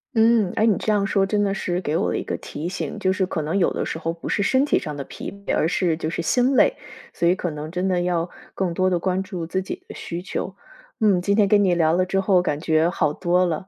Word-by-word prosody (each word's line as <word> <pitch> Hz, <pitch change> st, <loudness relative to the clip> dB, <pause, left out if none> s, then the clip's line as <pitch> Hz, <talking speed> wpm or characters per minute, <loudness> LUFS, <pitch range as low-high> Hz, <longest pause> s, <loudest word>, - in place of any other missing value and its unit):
嗯， 225 Hz, -4 st, +4 dB
哎， 220 Hz, -, +4 dB
你 215 Hz, -4 st, +3 dB
这 215 Hz, -, -1 dB
样 200 Hz, -2 st, +2 dB
说 195 Hz, -2 st, +2 dB
真 205 Hz, +1 st, 0 dB
的 200 Hz, -1 st, +1 dB
是 180 Hz, -2 st, -2 dB
给 155 Hz, -4 st, -2 dB
我 190 Hz, -, +1 dB
了 -, -, -1 dB
一 -, -, -3 dB
个 -, -, -2 dB
提 150 Hz, +3 st, -6 dB
醒， 185 Hz, -, -4 dB
就 185 Hz, -, +1 dB
是 190 Hz, 0 st, 0 dB
可 180 Hz, -3 st, -3 dB
能 160 Hz, +6 st, -1 dB
有 180 Hz, -, +2 dB
的 -, -, -2 dB
时 -, -, -4 dB
候 165 Hz, 0 st, -2 dB
不 170 Hz, -, -8 dB
是 200 Hz, -, +1 dB
身 260 Hz, +6 st, +3 dB
体 -, -, +2 dB
上 150 Hz, -1 st, -4 dB
的 140 Hz, -, -5 dB
疲 -, -, -7 dB
惫， 200 Hz, 0 st, -3 dB
而 -, -, +2 dB
是 170 Hz, -4 st, +1 dB
就 160 Hz, -1 st, -3 dB
是 170 Hz, -, -3 dB
心 250 Hz, +9 st, +2 dB
累， -, -, +5 dB, 0.4 s
所 -, -, -1 dB
以 180 Hz, -, +5 dB
可 180 Hz, -2 st, -3 dB
能 150 Hz, +1 st, -6 dB
真 180 Hz, +1 st, -1 dB
的 180 Hz, -2 st, +1 dB
要 175 Hz, -1 st, 0 dB, 0.2 s
更 180 Hz, -3 st, -1 dB
多 185 Hz, +2 st, +2 dB
地 180 Hz, -2 st, +1 dB
关 190 Hz, +1 st, 0 dB
注 175 Hz, -4 st, -5 dB
自 190 Hz, +2 st, -1 dB
己 190 Hz, -, -7 dB
的 -, -, -9 dB
需 170 Hz, +1 st, -5 dB
求。 185 Hz, 0 st, -4 dB, 0.5 s
嗯， 200 Hz, -5 st, +3 dB
今 200 Hz, +2 st, +1 dB
天 205 Hz, -2 st, +5 dB
跟 205 Hz, 0 st, +4 dB
你 185 Hz, -2 st, +3 dB
聊 160 Hz, -2 st, +3 dB
了 185 Hz, +2 st, +2 dB
之 195 Hz, +1 st, 0 dB
后， 190 Hz, -2 st, +3 dB
感 150 Hz, -4 st, -1 dB
觉 160 Hz, 0 st, +2 dB
好 155 Hz, -5 st, 0 dB
多 180 Hz, +2 st, +2 dB
了， 170 Hz, +2 st, -3 dB
185 Hz, 305 characters per minute, -23 LUFS, 170-195 Hz, 0.5 s, 累